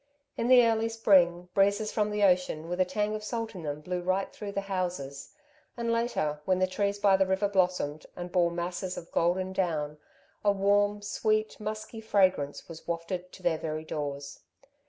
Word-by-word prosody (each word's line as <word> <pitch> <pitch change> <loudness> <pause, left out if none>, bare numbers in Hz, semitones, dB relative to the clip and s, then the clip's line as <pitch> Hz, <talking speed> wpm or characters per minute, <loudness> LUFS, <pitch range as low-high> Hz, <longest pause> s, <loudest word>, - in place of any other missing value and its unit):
In 230 - -1
the 250 -1 +7
early 225 0 +2
spring, 180 -6 +3
breezes 200 +2 +2
from 210 -1 +1
the 210 0 0
ocean 180 -4 +2
with 180 +2 -1
a - - +4
tang 210 +3 -1
of 215 0 -4
salt 225 0 -3
in 185 - -7
them 150 -1 -4
blew 180 +3 -3
right 185 +2 -1
through 205 -1 -6
the 200 - -1
houses, 175 -8 -4 0.4
and 235 -1 -1
later, 230 -11 0
when 185 -1 +2
the 185 - +3
trees 200 +2 -1
by 200 -1 +4
the 190 0 +2
river 190 +2 +1
blossomed, 180 -6 0
and 175 0 -6
bore 175 -2 +3
masses 175 +2 -4
of 170 - -8
golden 185 +2 +1
down, 155 -5 -1 0.4
a 205 - +5
warm, 205 +1 +2
sweet, 215 +1 0
musky 215 +1 -5
fragrance 185 -9 +1
was 165 -1 -11
wafted 175 +2 -3
to 185 - -14
their 165 -3 +1
very 155 0 -4
doors. 145 -2 -5
185 Hz, 185 wpm, -29 LUFS, 170-210 Hz, 0.4 s, the